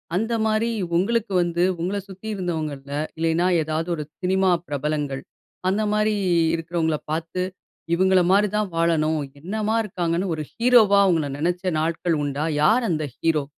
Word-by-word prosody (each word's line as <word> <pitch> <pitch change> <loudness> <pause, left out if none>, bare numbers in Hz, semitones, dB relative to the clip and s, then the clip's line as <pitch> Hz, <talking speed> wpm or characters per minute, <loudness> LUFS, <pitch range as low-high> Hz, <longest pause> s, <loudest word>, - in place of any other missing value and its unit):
அந்த 225 +4 0
மாரி 220 +2 +1 0.3
உங்களுக்கு 210 +3 +1
வந்து 175 0 0 0.2
உங்கள 190 +4 -1
சுத்தி 195 +3 -10
இருந்தவங்கள்ல, 155 -6 -4 0.3
இல்லைன்னா 165 +2 +1 0.2
ஏதாவது 160 +2 -2
ஒரு 150 - -4 0.2
சினிமா 190 +1 +2 0.2
பிரபலங்கள், 145 -1 -2 0.5
அந்த 205 +3 +1
மாரி 215 0 +2 0.4
இருக்குறவங்கள 165 -1 -1
பார்த்து 165 +3 -2 0.5
இவுங்கள 190 +1 +4
மாரி 205 +2 +4
தான் 210 -2 0
வாழணும். 160 -2 +1 0.2
என்னம்மா 215 +7 -2
இருக்காங்கன்னு 175 -2 -1
ஒரு 155 - -4
ஹீரோவா 230 -4 +5
அவங்கள 165 -6 +2
நினைச்ச 175 +4 -1 0.2
நாட்கள் 165 +1 0
உண்டா? 145 +1 -2 0.2
யார் 225 +10 +4
அந்த 155 -3 0
ஹீரோ? 160 -3 +1
175 Hz, 135 wpm, -23 LUFS, 160-200 Hz, 0.5 s, ஹீரோவா